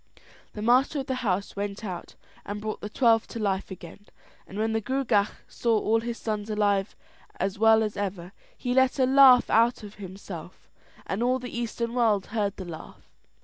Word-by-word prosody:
The 210 - -6
master 255 +5 +3
of - - -8
the 265 - -2
house 200 -4 -1
went 200 +2 -4
out 180 -3 -7 0.3
and 205 +1 -5
brought 215 0 -5
the 210 - -5
twelve 230 -1 +3
to 230 - -7
life 195 -2 -1
again; 190 +2 -11 0.4
and 195 - -9
when 220 +1 0
the 225 - 0
Gruagach 250 -5 +1 0.2
saw 230 -2 0
all 220 +1 +2
his 235 +1 -4
sons 215 -1 -4
alive 205 -2 0 0.4
and - - -3
as 195 +1 -4
well 220 0 +5
as 210 -1 -3
ever, 190 -3 -4 0.3
he 245 -1 -2
let 260 +1 +3
a 260 - +4
laugh 260 -1 +7
out 230 +1 +3
of 205 -1 -9
himself, 185 -3 -9 0.4
and 195 +4 -3
all 250 +2 +2
the 250 -2 -8
Eastern 235 0 -3
world 220 -5 +2
heard 205 -3 -1
the 190 - -6
laugh. 165 -2 -11
215 Hz, 190 wpm, -26 LUFS, 200-235 Hz, 0.4 s, laugh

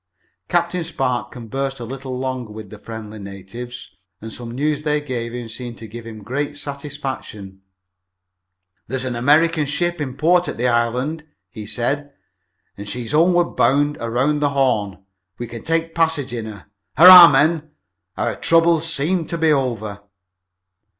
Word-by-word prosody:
Captain 175 0 0
Spark 135 -7 -2
conversed 135 +3 -4
a 120 - -6
little 130 +1 -6
longer 130 -3 -4
with 105 -2 -10
the 105 - -10
friendly 110 -1 -8
savages, 110 +5 -9 0.3
and 110 0 -8
some 120 -1 -7
news 145 +4 -1
they 150 -1 0
gave 125 -5 -4
him 120 -1 -6
seemed 120 +1 -7
to 115 - -9
give 115 +2 -9
him 110 -2 -9
great 145 +6 -3
satisfaction. 140 -9 -6 1.3
"There's 130 +2 -3
an 125 -2 -3
American 150 +5 +3
ship 175 +3 -1
in 130 -2 -4
port 175 +2 +3
at - - -4
the 125 +2 +1
island," 125 +7 -1 0.2
he 105 +2 -8
said, 145 +6 -2 0.6
"and 100 0 -8
she's 120 +1 -5
homeward 175 +3 +3
bound 145 +2 +2
around 125 +6 0
the 145 -1 +2
Horn. 110 -9 0 0.3
We 120 - -5
can 115 -1 -8
take 165 +2 -1
passage 160 -6 0
in 115 -2 -4
her. 105 -2 -10 0.3
Hurrah, 180 +2 +12
men, 155 +3 +2 0.5
our - - -1
troubles 165 -1 +2
seem 165 +2 -1
to 170 - -3
be 160 -1 +3
over!" 115 -8 -1
130 Hz, 155 wpm, -20 LUFS, 115-150 Hz, 1.3 s, Hurrah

